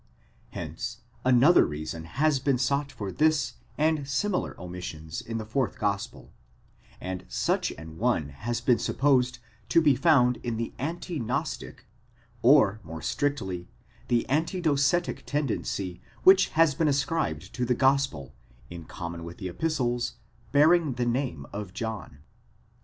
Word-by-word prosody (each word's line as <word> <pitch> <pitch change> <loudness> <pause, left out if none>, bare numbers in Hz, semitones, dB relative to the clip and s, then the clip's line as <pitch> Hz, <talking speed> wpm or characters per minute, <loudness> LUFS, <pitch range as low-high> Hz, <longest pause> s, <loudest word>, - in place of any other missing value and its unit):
Hence - - -6 0.2
another 130 +7 +6
reason 80 +2 -5
has 140 - +1
been 135 -1 +1
sought 140 +3 0
for 105 -6 -5
this 155 +2 +2 0.2
and 155 -2 +1
similar 180 +8 -1
omissions 85 -3 -6
in 115 0 -5
the 110 - -4
fourth 120 +3 -1
gospel; 100 -1 -3 0.7
and 95 0 -5
such - - 0
an 80 +1 -11
one 110 -11 +1
has 110 +12 -4
been 125 -2 +3
supposed 130 -3 +2 0.3
to - - +5
be 150 -4 +4
found 125 -4 +4
in 120 -2 -4
the 115 0 -3
anti 165 +3 -3
gnostic, 120 +1 -3 0.6
or, 115 -5 +5
more 80 -2 -8
strictly, 95 -12 -2 0.4
the 120 -1 +1
anti 160 +7 0
docetic 160 +1 +1
tendency 105 -10 -2 0.2
which 190 +1 +7
has 165 -3 +5
been 155 +3 +1
ascribed 135 - -1
to 125 - -2
the 125 0 +2
gospel, 135 - +1 0.4
in 85 -2 -8
common 85 0 -6
with 85 +1 -8
the 95 -3 -5
epistles, 120 - -1 0.4
bearing 155 +1 +4
the 120 0 -1
name 120 - -1
of 100 -2 -6
John. 110 - -5
125 Hz, 140 wpm, -27 LUFS, 95-145 Hz, 0.7 s, which